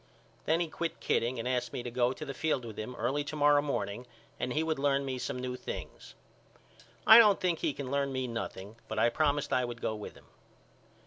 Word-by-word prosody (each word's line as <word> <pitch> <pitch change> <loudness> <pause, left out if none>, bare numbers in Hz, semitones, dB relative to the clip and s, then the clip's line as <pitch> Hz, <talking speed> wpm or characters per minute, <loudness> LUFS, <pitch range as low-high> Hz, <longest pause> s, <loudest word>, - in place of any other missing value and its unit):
Then 160 +2 +2
he 170 - 0
quit 165 +1 -4
kidding 120 +2 0
and 115 +1 -3
asked 125 -2 -1
me 120 - -4
to 120 - -5
go 125 0 +2
to 155 +4 -6
the 140 - -5
field 135 -3 -1
with 110 -2 -8
him 125 +4 -5
early 130 +6 -1
to 155 - -5
morrow 145 -1 +5
morning 120 -4 -3 0.3
and 125 - -2
he 155 +4 +1
would 160 -3 -1
learn 140 0 +1
me 130 -1 -3
some 125 - -3 0.2
things. - - -8 0.9
I 220 +1 +11
don't 210 -4 +6
think 175 -3 0
he - - 0
can 135 -2 -6
learn 140 -1 0
me 130 -1 -2
nothing 115 -2 -6
but 110 - -5
I 110 - +4
promised 145 +1 0
I 125 - +3
would 120 -1 -5
go 110 - -1
with 105 -1 -8
him. - - -17
130 Hz, 220 wpm, -31 LUFS, 120-145 Hz, 0.9 s, I